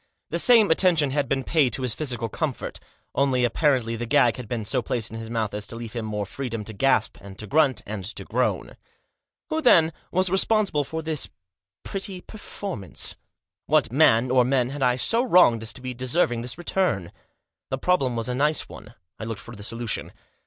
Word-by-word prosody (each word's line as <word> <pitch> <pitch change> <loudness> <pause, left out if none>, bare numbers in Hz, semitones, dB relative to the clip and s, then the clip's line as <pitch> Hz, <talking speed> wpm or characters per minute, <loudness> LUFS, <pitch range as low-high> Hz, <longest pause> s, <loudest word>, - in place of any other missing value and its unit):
The - - 0
same 225 -7 +6
attention 160 -5 +4
had 140 -2 -1
been 135 -1 0
paid 145 -5 +2
to 130 - -2
his 125 -3 0
physical 120 -3 -2
comfort; 140 +4 -4 0.3
only 135 -2 +1
apparently 120 -3 +1
the 120 +1 -5
gag 125 -1 +3
had 125 -3 -7
been 115 -2 -3
so 125 +4 +1
placed 115 -1 -3
in 115 - -6
his 115 0 -7
mouth 110 -3 -2
as 105 0 -3
to 115 - -7
leave 115 -1 -7
him 115 -2 -4
more 105 -1 -3
freedom 115 0 -5
to 110 - -6
gasp, 135 +7 +1
and 100 -1 -11
to 110 - -7
grunt, 140 +2 +2
and 105 -2 -5
to 105 - -5
groan. - - -2 0.7
Who, 315 0 0
then, 165 - +5 0.2
was 185 0 +1
responsible 195 -5 +2
for 160 +3 -5
this 155 -2 -2 0.5
pretty 195 -1 -4
perform 200 - -7
since - - 0
t - - -13 0.5
What 145 -6 +2
man, 125 -3 +4
or 130 -1 +5
men, 125 0 +1
had 145 0 -6
I 125 -1 +3
so 230 - +3
wronged 180 - +5
as 110 - -5
to 130 - -9
be 130 0 -5
deserving 125 -1 0
this 125 +3 -4
return? 175 - -1 0.6
The 135 - -2
problem 135 -5 +1
was 115 -1 -2
a 125 - -1
nice 150 +4 +1
one. 110 +3 -13 0.2
I 110 - -5
looked 115 -1 -5
for 120 - -11
the 105 - -11
solution. 115 0 -3
125 Hz, 205 wpm, -24 LUFS, 115-155 Hz, 0.7 s, same